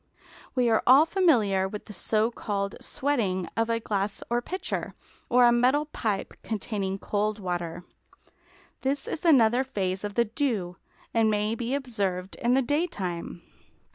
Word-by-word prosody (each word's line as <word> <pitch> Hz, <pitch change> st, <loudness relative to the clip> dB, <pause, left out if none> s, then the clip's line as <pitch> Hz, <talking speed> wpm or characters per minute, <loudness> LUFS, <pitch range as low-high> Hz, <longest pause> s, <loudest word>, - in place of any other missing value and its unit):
We 250 Hz, -2 st, +3 dB
are 225 Hz, -1 st, +3 dB
all 270 Hz, +5 st, +8 dB
familiar 240 Hz, -, +3 dB
with 210 Hz, +2 st, -7 dB
the 210 Hz, -, -10 dB
so 215 Hz, +4 st, +1 dB
called 200 Hz, -4 st, -3 dB
"sweating" 205 Hz, -11 st, -1 dB
of 225 Hz, 0 st, 0 dB
a 230 Hz, 0 st, +1 dB
glass 205 Hz, -2 st, -2 dB
or 240 Hz, 0 st, +2 dB
pitcher, 370 Hz, +9 st, -4 dB, 0.3 s
or 245 Hz, 0 st, +6 dB
a 240 Hz, -, +6 dB
metal 255 Hz, +5 st, +3 dB
pipe 220 Hz, -9 st, -3 dB
containing 200 Hz, -3 st, -3 dB
cold 210 Hz, +2 st, -1 dB
water; 175 Hz, -3 st, -4 dB, 1.0 s
this 275 Hz, +1 st, -1 dB
is 325 Hz, -, -4 dB
another 250 Hz, -5 st, +5 dB
phase 195 Hz, -7 st, -2 dB
of 205 Hz, -1 st, -4 dB
the 235 Hz, -, +3 dB
dew, 215 Hz, -, -2 dB, 0.4 s
and 225 Hz, -1 st, +3 dB
may 210 Hz, +1 st, +1 dB
be 235 Hz, +3 st, -2 dB
observed 200 Hz, -9 st, -2 dB
in 240 Hz, +2 st, +2 dB
the 270 Hz, -, +3 dB
daytime. 195 Hz, -, -2 dB
220 Hz, 150 wpm, -27 LUFS, 195-250 Hz, 1.0 s, all